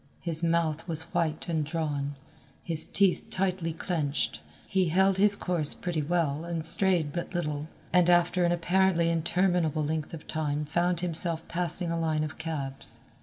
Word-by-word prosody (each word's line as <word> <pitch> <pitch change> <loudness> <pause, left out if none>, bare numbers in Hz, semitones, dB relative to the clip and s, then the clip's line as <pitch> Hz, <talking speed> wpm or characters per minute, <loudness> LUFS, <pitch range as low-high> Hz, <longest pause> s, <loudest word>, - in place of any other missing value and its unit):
His 165 -2 -3
mouth 165 -1 -1
was 160 -2 +1
white 165 -2 -2
and 160 -3 -1
drawn, 145 -3 -4 0.5
his 160 -2 +3
teeth 195 -3 +1
tightly 185 -3 -2
clinched. 160 -3 -3 0.3
He 190 -2 0
held 190 +3 +2
his 205 0 +4
course 175 -6 0
pretty 175 -3 -3
well 155 -1 -1
and 170 -2 -3
strayed 170 -4 +9
but 175 +1 -6
little, 150 -3 -3 0.3
and 180 -1 +3
after 175 +1 +2
an 175 - +1
apparently 175 0 +1
interminable 170 -2 0
length 155 +1 -4
of 150 - -13
time 150 -1 -3
found 175 +3 -1
himself 165 -1 -2
passing 175 0 -2
a 170 - -2
line 155 -2 -1
of 155 - -7
cabs. 135 -7 -5
165 Hz, 160 wpm, -27 LUFS, 155-175 Hz, 0.5 s, strayed